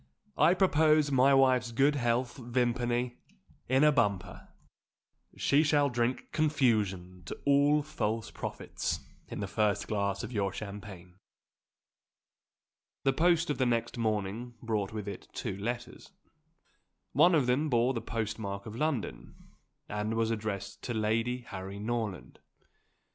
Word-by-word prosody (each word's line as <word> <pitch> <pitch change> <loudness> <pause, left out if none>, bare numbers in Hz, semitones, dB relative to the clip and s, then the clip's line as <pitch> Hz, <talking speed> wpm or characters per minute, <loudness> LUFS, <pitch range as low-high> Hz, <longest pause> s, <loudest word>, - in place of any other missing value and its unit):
"I 175 - +6
propose 155 -5 +4
my 135 +1 +5
wife's 130 -2 +3
good 135 +5 +3
health, 120 -1 0
Vimpany, 120 0 -1 0.5
in 130 +2 +4
a 150 - +7
bumper. 100 - -1 0.9
She 145 - +3
shall 145 -2 +3
drink 120 +1 -1
confusion 105 - +1
to - - -7
all 145 +1 +4
false 115 -6 -3
prophets - - -4 0.3
in - - -6
the 100 - -2
first 105 0 0
glass 100 -2 -1
of - - -6
your 100 -4 0
champagne!" 100 -3 -9 1.9
The 135 - +3
post 165 +1 +3
of 145 - -3
the 130 - +3
next 115 -1 0
morning 110 +1 -2
brought 105 -4 -1
with 105 -2 -5
it 100 -2 -7
two 95 - -4
letters. 120 +4 -5 1.0
One 170 +6 +5
of 145 -5 +3
them 135 +5 +1
bore 120 +1 +2
the 115 - -3
postmark 105 -3 -4
of 110 -1 -7
London, 145 -3 -3 0.5
and 105 +2 -2
was 115 0 +1
addressed 100 -3 -4
to 120 - -4
Lady 115 +3 0
Harry 95 -4 -7
Norland. 110 -2 -4
120 Hz, 130 wpm, -30 LUFS, 105-135 Hz, 1.9 s, a